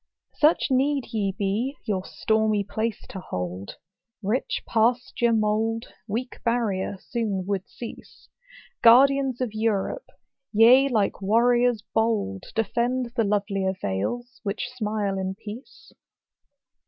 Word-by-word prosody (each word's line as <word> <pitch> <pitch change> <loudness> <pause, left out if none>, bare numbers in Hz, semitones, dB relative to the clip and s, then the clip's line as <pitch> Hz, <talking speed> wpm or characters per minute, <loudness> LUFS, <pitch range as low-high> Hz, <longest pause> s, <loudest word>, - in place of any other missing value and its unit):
Such 305 +1 +3
need 270 0 +1
ye 205 -3 0
be, 210 +8 -2
your 190 -3 -1
stormy 220 -1 +1
place 220 +2 -3
to 190 - -6
hold: 90 - -5 0.5
Rich 220 +7 -1
pasture 240 +1 +2
mould, 225 +1 0
weak 235 +4 -4
barrier, 215 -5 0
soon 205 -6 -3
would 195 -1 -2
cease. 235 - -10 0.5
Guardians 265 +2 +5
of 240 -4 -2
Europe! 220 - -1 0.4
ye, 245 +5 +6
like 210 -5 0
warriors 240 +2 +3
bold, 220 - 0
Defend 240 +3 0
the 230 - +2
lovelier 200 -2 0
vales, 240 - -3
which 210 +4 -3
smile 210 -4 -2
in 190 0 -3
peace. 230 - -11
220 Hz, 115 wpm, -25 LUFS, 200-245 Hz, 0.5 s, ye